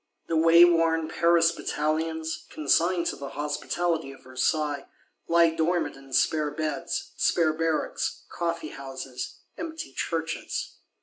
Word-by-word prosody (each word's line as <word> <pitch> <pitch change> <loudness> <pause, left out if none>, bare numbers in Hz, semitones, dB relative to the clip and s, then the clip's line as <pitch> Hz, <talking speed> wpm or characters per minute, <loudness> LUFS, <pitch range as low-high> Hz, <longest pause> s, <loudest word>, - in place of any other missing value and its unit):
The 165 - -1
wayworn 165 0 +5
Paris 170 0 +4
Batallions, 160 0 -2
consigned 170 +3 +2
to - - -1
"the 140 -1 -7
hospitality 155 +1 -1
of 135 - -15
Versailles," 145 +3 -1 0.4
lie 170 -1 +5
dormant 170 +2 0
in 135 0 -15
spare 150 +3 +2
beds, 155 +3 -3
spare 160 -3 +3
barracks, 160 -1 -1
coffeehouses, 135 -6 -5 0.2
empty 325 - -6
churches. 160 +2 -3
160 Hz, 110 wpm, -27 LUFS, 150-170 Hz, 0.4 s, wayworn